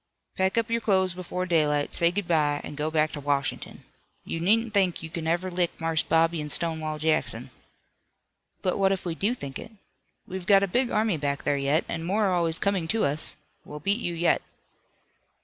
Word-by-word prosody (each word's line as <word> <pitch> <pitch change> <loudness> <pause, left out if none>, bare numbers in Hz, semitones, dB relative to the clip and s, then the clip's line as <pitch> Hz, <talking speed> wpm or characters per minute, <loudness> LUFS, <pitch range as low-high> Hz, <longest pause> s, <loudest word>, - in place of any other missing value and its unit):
"Pack 190 +3 +1
up 230 0 +1
your 230 0 +1
clothes 190 -4 +2
before 180 0 -4
daylight, 150 -4 +1
say 170 - +3
good 190 +1 -3
bye, 150 -3 +2
and - - -7
go 150 +1 -1
back 155 -1 +1
to 150 - -6
Washington. 140 -1 -2 0.4
You 165 - -4
needn't 220 +5 +2
think 190 -5 +1
you 160 - -7
kin 160 -1 -4
ever 175 +3 0
lick 175 -1 -1
Marse 165 -1 +1
Bobby 165 0 +2
an' 150 - -5
Stonewall 160 -1 -1
Jackson." 155 +1 0 1.1
"But 185 0 0
what 195 -1 +3
if 190 -1 -2
we 170 - -1
do 205 +9 0
think 140 - -7
it? - - -10 0.5
We've 185 -1 -7
got 200 -1 +6
a - - +1
big 245 +6 +1
army 215 -4 +1
back 140 -1 -2
there 145 - +1
yet, 140 +4 +1
and 165 -1 -4
more 205 +5 +1
are 190 - +2
always 165 -2 +3
coming 195 -5 0
to 225 +5 +1
us. 145 +3 0 0.3
We'll 150 - -9
beat 200 +8 +2
you 175 -7 -2
yet." 170 +1 +2
170 Hz, 200 wpm, -26 LUFS, 155-195 Hz, 1.1 s, got